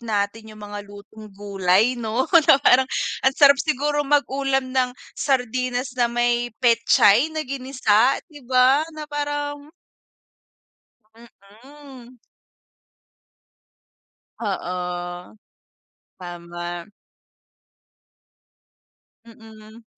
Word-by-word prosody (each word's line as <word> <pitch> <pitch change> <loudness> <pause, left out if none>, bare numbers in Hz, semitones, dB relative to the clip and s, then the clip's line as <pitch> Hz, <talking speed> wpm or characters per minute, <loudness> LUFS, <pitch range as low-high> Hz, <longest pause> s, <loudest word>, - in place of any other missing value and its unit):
natin 220 -1 -3
'yung 215 - -14
mga 205 0 -7
lutong 205 +2 -13
gulay 200 +3 +1
no, 230 +3 -1
kumbaga 330 -6 +6
parang 260 +1 +4 0.4
ang 265 - +3
sarap 280 0 +6
siguro 295 0 -1
mag-ulam 270 -2 0
ng 255 -1 +1 0.3
sardinas 255 -1 -1
na 240 - +3
may 240 0 0
petchay 230 +3 +4
na 310 - -2
ginisa 255 -3 +1
di 295 - -12
ba, 260 +3 +4
na 310 -1 -7
parang 290 0 -4 1.4
Mm. 245 +4 -16 2.2
Oo. 180 -2 -5 0.8
Tama. 175 -1 -7 2.4
Mm. 220 0 -16
240 Hz, 80 wpm, -22 LUFS, 205-270 Hz, 2.4 s, kumbaga